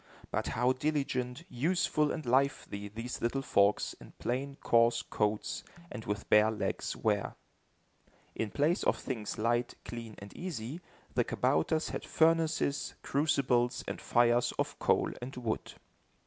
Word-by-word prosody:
But - - -1
how 125 +3 +2
diligent, 135 -1 -1
useful 150 +2 +1
and 155 - -4
lively 130 -5 +1
these 115 +4 -6
little 135 +4 0
folks, 100 -4 +3
in - - -13
plain, 135 +3 -2
coarse 115 0 +4
coats 105 -1 -1 0.3
and 110 - -7
with 105 0 -3
bare 105 +1 +6
legs, 110 - -2
were! - - 0 1.0
In 110 - -2
place 150 - +1
of - - +2
things 115 -5 -4
light, 120 +2 +1
clean 115 -2 -7
and 100 0 -10
easy, 160 -3 -5 0.3
the - - +3
kabouters 155 - +1
had - - -4
furnaces, 160 -3 +2
crucibles 135 -4 +2
and - - -4
fires 120 0 +3
of - - -2
coal - - +2
and 130 +2 -6
wood. 120 -3 -3
125 Hz, 135 wpm, -32 LUFS, 115-140 Hz, 1.0 s, bare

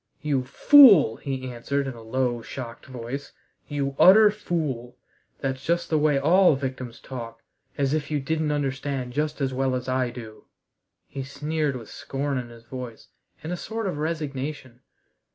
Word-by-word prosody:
"You 140 -4 0
fool!" 195 - +7
he 130 -2 -4
answered 140 +4 -2
in 135 - -4
a 115 - -12
low, 120 +1 -1
shocked 120 +1 -8
voice, 130 +2 -7 0.3
"you 140 -2 -2
utter 210 +3 +8
fool. 145 - -3 0.4
That's 130 -1 -3
just 170 +1 -1
the 155 - +3
way 150 -1 +3
all 170 +4 +5
victims 130 -3 -5
talk. 115 -3 -8 0.3
As 140 0 +1
if 155 -1 -2
you 150 -1 0
didn't 155 +2 -1
understand 135 -3 -2
just 150 +1 -2
as 135 -1 0
well 130 0 0
as 125 0 -4
I 130 -1 0
do!" 115 -3 -10 0.6
he 135 - -6
sneered 150 +2 -2
with 115 -4 -9
scorn 140 -1 -3
in 120 -1 -7
his 115 -1 -14
voice, 125 -2 -9 0.3
and 160 +3 -3
a - - -1
sort 225 +5 -5
of 180 -6 -3
resignation. 145 -5 -4
135 Hz, 165 wpm, -25 LUFS, 125-150 Hz, 0.6 s, utter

